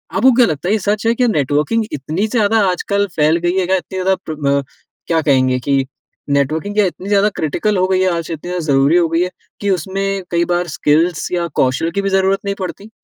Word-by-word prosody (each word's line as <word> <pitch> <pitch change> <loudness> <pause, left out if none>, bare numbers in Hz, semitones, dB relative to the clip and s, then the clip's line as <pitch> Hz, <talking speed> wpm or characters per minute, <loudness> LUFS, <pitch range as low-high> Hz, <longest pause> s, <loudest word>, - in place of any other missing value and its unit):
आपको 260 - +5
क्या 245 0 +5
लगता 160 -2 -3
है, - - +3
ये 220 - +1
सच 205 +2 -1
है? 230 - +4
क्या 250 0 +2
नेटवर्किंग 150 - +1
इतनी 155 +10 -2
ज़्यादा 220 -1 +2
आजकल 200 +3 -1
फैल 155 +1 +3
गयी 175 +2 +1
है? 185 - +1
क्या 190 - +2
इतनी 190 +1 -7
ज़्यादा 190 +1 +2
प्र 155 - -4
ब 140 0 +2 0.4
क्या 165 -1 +2
कहेंगे 130 -4 +2
कि 135 +1 0 0.4
नेटवर्किंग 155 +8 0
क्या 210 -1 +4
इतनी 185 +1 -5
ज़्यादा 205 0 +3
क्रिटिकल 195 +7 0
हो 185 0 +2
गयी 185 0 +1
है 185 - +2
आज, 170 0 -5
इतनी 160 -2 -5
ज़्यादा 180 -3 -3
ज़रूरी 140 +3 +3
हो 175 -1 +3
गयी 165 +2 +1
है 180 - -2 0.3
कि 205 - -1
उसमें 195 +2 -1
कई 170 0 +2
बार 175 0 -1
स्किल्स 160 +3 +1
या 175 -1 -1
कौशल 130 +6 +1
की 200 - -1
भी 195 - -1
ज़रूरत 195 0 +2
नहीं 200 0 -1
पड़ती? 195 +3 -6
180 Hz, 230 wpm, -17 LUFS, 155-200 Hz, 0.4 s, आपको